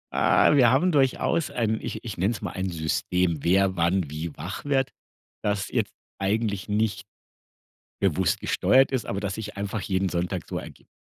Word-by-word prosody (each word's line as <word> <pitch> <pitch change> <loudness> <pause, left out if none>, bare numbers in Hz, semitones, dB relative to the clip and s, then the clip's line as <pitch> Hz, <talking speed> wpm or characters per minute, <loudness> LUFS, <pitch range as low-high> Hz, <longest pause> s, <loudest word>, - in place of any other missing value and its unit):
Ah, - - +4
wir 125 -4 +6
haben 145 +9 +3
durchaus 140 +1 +2
ein, 110 -2 0
ich - - -5
ich 110 -5 -6
nenne 100 +6 +2
es - - -7
mal: - - -3
"Ein 95 0 -3
System", 85 +1 0
wer 95 +3 +3
wann 85 -2 +1
wie 80 +2 -4
wach 90 +8 -6
wird, 135 -2 +1 0.5
das 100 -1 -1
jetzt - - -1 0.3
eigentlich 100 0 -1
nicht 105 0 0 0.9
bewusst - - +1
gesteuert 135 +1 +3
ist, 130 -4 -1
aber 100 - -2
das 100 -1 -3
sich 105 -1 -6
einfach 100 +1 -3
jeden 95 -1 0
Sonntag 90 +1 -2
so - - -3
ergibt. - - -12
100 Hz, 175 wpm, -26 LUFS, 90-115 Hz, 0.9 s, wir